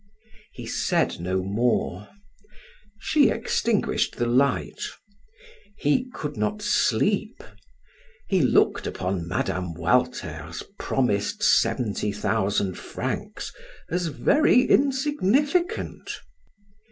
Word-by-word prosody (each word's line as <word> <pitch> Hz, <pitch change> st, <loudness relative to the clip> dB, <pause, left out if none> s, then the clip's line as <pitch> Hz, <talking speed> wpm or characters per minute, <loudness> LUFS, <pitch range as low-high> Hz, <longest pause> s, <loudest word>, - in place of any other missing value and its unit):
He -, -, -9 dB
said -, -, 0 dB
no 90 Hz, +2 st, -1 dB
more. 105 Hz, -1 st, 0 dB, 0.9 s
She 285 Hz, +6 st, +3 dB
extinguished 230 Hz, -1 st, 0 dB
the 120 Hz, -, -1 dB
light. 130 Hz, +3 st, +1 dB, 1.0 s
He 245 Hz, -, +1 dB
could 150 Hz, -8 st, -5 dB
not 105 Hz, 0 st, -1 dB
sleep. -, -, +1 dB, 0.8 s
He -, -, +2 dB
looked -, -, +3 dB
upon 90 Hz, -2 st, -3 dB
Mme. 90 Hz, -1 st, -2 dB
Walter's 85 Hz, -5 st, -1 dB, 0.2 s
promised 105 Hz, -6 st, 0 dB
seventy 105 Hz, -3 st, +2 dB
thousand 100 Hz, -2 st, -1 dB
francs -, -, -5 dB, 0.4 s
as 180 Hz, 0 st, 0 dB
very 255 Hz, -, +4 dB
insignificant. 285 Hz, -, +1 dB
120 Hz, 85 wpm, -25 LUFS, -, 1.0 s, very